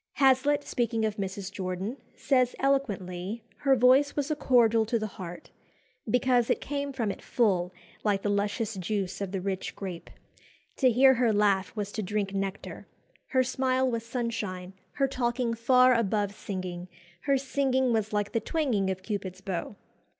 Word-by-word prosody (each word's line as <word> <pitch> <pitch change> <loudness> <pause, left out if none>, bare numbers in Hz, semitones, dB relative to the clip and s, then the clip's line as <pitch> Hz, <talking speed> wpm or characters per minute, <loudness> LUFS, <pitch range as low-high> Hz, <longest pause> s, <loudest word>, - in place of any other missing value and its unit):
Hazlitt, 280 +2 +3
speaking 230 -4 -1
of 215 0 -2
Mrs. 195 0 -4
Jordan, 190 +5 -4 0.2
says 255 -3 +2
eloquently, 210 -7 -1
her 275 -2 +3
voice 260 +4 +4
"was 290 +1 -1
a - - +1
cordial 235 -5 +4
to 230 - +1
the 215 - -2
heart, 180 -4 -8 0.6
because 245 0 +2
it - - +2
came 285 0 -3
from 235 -6 -1
it - - -9
full, 185 -7 +1 0.3
like 200 -2 +1
the 205 - 0
luscious 205 +2 -1
juice 195 0 -3
of 195 -2 -3
the 195 - -2
rich 190 0 -3
grape. 185 -4 -7 0.7
To 260 - +4
hear 265 +3 +6
her 240 -2 +2
laugh 200 -2 +2
was 205 -2 -3
to 215 - -3
drink 200 0 -2
nectar. 195 0 -4 0.4
Her 260 -3 +2
smile 260 0 +1
was 230 -1 -2
sunshine; 225 -6 -4 0.2
her 275 -1 +1
talking 240 -2 -1
far 255 +2 +5
above 205 -3 0
singing; 185 -3 -5 0.4
her 275 -1 +3
singing 265 -2 +1
was 220 -1 0
like 205 -1 -1
the 230 - +1
twanging 225 -7 0
of 190 0 -3
Cupid's 190 -3 -4
bow. 195 +1 -4
220 Hz, 165 wpm, -28 LUFS, 195-255 Hz, 0.7 s, hear